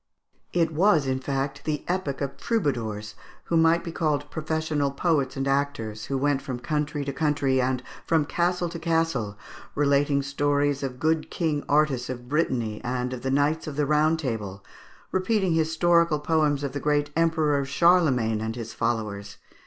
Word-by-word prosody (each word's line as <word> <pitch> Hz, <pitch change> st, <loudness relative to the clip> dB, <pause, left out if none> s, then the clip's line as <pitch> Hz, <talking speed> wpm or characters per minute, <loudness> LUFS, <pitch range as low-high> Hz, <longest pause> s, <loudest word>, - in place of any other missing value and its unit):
It 170 Hz, -2 st, +1 dB
was, 165 Hz, -3 st, +4 dB
in 130 Hz, 0 st, 0 dB
fact, 135 Hz, +1 st, -3 dB
the 150 Hz, -2 st, -2 dB
epoch 175 Hz, -7 st, -2 dB
of 140 Hz, -1 st, -3 dB
troubadours, 120 Hz, -, -2 dB, 0.3 s
who 170 Hz, -, -2 dB
might 165 Hz, +1 st, +4 dB
be 170 Hz, -, -5 dB
called 150 Hz, -3 st, -1 dB
professional 155 Hz, -2 st, -1 dB
poets 140 Hz, -2 st, 0 dB
and 135 Hz, 0 st, -1 dB
actors, 135 Hz, -6 st, -1 dB
who 135 Hz, -, -2 dB
went 140 Hz, 0 st, +1 dB
from 130 Hz, -2 st, -4 dB
country 150 Hz, +2 st, -2 dB
to 140 Hz, -, -3 dB
country, 140 Hz, -3 st, +1 dB
and 130 Hz, 0 st, -1 dB, 0.2 s
from 160 Hz, -3 st, +3 dB
castle 175 Hz, +3 st, 0 dB
to 170 Hz, 0 st, -6 dB
castle, 160 Hz, -, 0 dB, 0.4 s
relating 140 Hz, 0 st, +2 dB
stories 145 Hz, 0 st, 0 dB
of 130 Hz, -2 st, -4 dB
good 160 Hz, +1 st, +1 dB
King 155 Hz, -4 st, -1 dB
Artus 145 Hz, -4 st, +2 dB
of 125 Hz, -1 st, -6 dB
Brittany 125 Hz, -7 st, -1 dB
and 125 Hz, 0 st, -2 dB
of 125 Hz, -, -6 dB
the 135 Hz, -, -2 dB
Knights 145 Hz, +4 st, +1 dB
of 150 Hz, -, -5 dB
the 150 Hz, 0 st, +1 dB
Round 155 Hz, +2 st, +3 dB
Table; 105 Hz, -9 st, -4 dB, 0.5 s
repeating 190 Hz, -1 st, +1 dB
historical 165 Hz, 0 st, +3 dB
poems 150 Hz, -2 st, +1 dB
of 140 Hz, -, -2 dB
the 145 Hz, -, -2 dB
great 145 Hz, 0 st, 0 dB
Emperor 160 Hz, -3 st, +2 dB
Charlemagne 140 Hz, -7 st, +3 dB
and 110 Hz, 0 st, -3 dB
his 115 Hz, -2 st, -6 dB
followers. 105 Hz, -3 st, -2 dB
145 Hz, 165 wpm, -26 LUFS, 130-160 Hz, 0.5 s, was